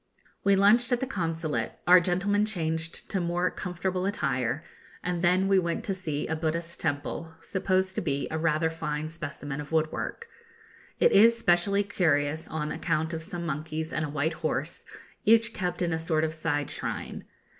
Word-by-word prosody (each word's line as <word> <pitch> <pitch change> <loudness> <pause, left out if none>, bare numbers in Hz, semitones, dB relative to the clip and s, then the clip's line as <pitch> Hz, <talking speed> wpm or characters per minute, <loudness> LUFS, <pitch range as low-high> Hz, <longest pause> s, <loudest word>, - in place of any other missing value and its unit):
We 200 0 +5
lunched 215 +5 +5
at 245 - +3
the 265 - -1
Consulate, 165 - -2
our 180 +1 +8
gentlemen 195 +4 +1
changed 165 -5 -2
to 190 - +1
more 175 +1 0
comfortable 185 +1 -2
attire, 135 - -1 0.4
and 180 -1 -1
then 180 +2 +3
we 195 -1 +5
went 170 +5 -2
to 205 -4 -1
see 155 -6 -2
a 160 - -2
Buddhist 165 +1 -2
temple, 160 +3 -3
supposed 190 0 0
to - - -2
be 140 -4 -1
rather 160 0 +1
a - - -8
fine 155 -1 -3
specimen 150 -3 -5
of 150 - -10
woodwork. 160 - -1 0.7
It - - +5
is 230 +3 +7
specially 200 0 +3
curious 155 -5 +1
on 155 -1 -3
account 160 0 -1
of 160 - -3
some 170 0 -4
monkeys 155 +1 -3
and 155 - 0
a 150 - -3
white 150 +2 0
horse, - - -3 0.4
each 230 +1 +4
kept 180 -1 -2
in 170 -1 0
a 160 - -1
sort 160 -1 +1
of 160 0 0
side 155 -3 -1
shrine. - - -4
170 Hz, 175 wpm, -28 LUFS, 155-190 Hz, 0.7 s, our